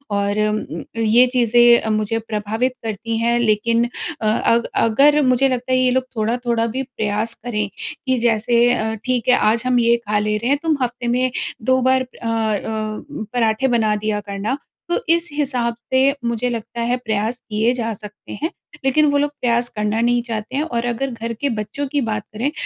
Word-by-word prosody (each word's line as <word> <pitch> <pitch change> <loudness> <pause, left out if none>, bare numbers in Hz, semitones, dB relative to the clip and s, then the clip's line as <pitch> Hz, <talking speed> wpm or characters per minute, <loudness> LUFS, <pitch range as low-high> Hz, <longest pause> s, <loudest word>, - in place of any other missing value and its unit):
और 200 +1 0 0.6
ये 230 +2 +5
चीज़ें 240 -1 +5
अ, 220 - -3
मुझे 215 +1 0
प्रभावित 220 +4 -1
करती 225 +1 -3
हैं 235 +1 +2
लेकिन 230 +1 +2 0.4
अ 215 - 0
अ, 230 +2 +3 0.2
अगर 280 +7 +4
मुझे 255 +1 +3
लगता 255 0 -2
है 255 - +4
ये 255 - +3
लोग 260 0 +2
थोड़ा-थोड़ा 230 +1 0
भी 265 - -1
प्रयास 220 -3 -2
करें 210 -4 -1 0.4
कि 260 -1 +2
जैसे 235 0 +2
अ, 220 -2 -1
ठीक 250 -3 0
है 250 - +7
आज 230 +2 +1
हम 250 -1 +3
ये 235 0 +4
खा 210 0 +2
ले 210 0 0
रहे 235 +4 -2
हैं 285 - +3
तुम 320 -2 +2
हफ्ते 240 0 -3
में 250 +1 +1 0.4
2 260 - +4
बार 260 0 +4
अ 255 -2 -9
अ, 220 -1 -2 0.3
पराठें 230 +2 +1
बना 220 -3 +2
दिया 210 -1 0
करना। 205 +7 -2 0.3
तो 345 - +1
इस 340 0 0
हिसाब 255 -5 -1 0.2
से 270 +2 +4
मुझे 235 +1 0
लगता 230 0 -5
है 245 +2 +1
प्रयास 220 0 -2
किए 215 +3 +2
जा 230 -2 -2
सकते 210 0 -12
हैं, 320 - 0 0.4
लेकिन 300 +3 +4
वो 285 - +2
लोग 290 0 +1
प्रयास 240 0 +1
करना 210 +1 -1
नहीं 240 0 +2
चाहते 225 +1 -5
हैं। 290 - +1
और 240 -6 -2
अगर 245 +3 -1
घर 230 0 -4
के 285 - +1
बच्चों 215 +7 -4
की 285 +1 -1
बात 220 -3 -2
करें 245 +7 -1
235 Hz, 190 wpm, -20 LUFS, 220-255 Hz, 0.6 s, है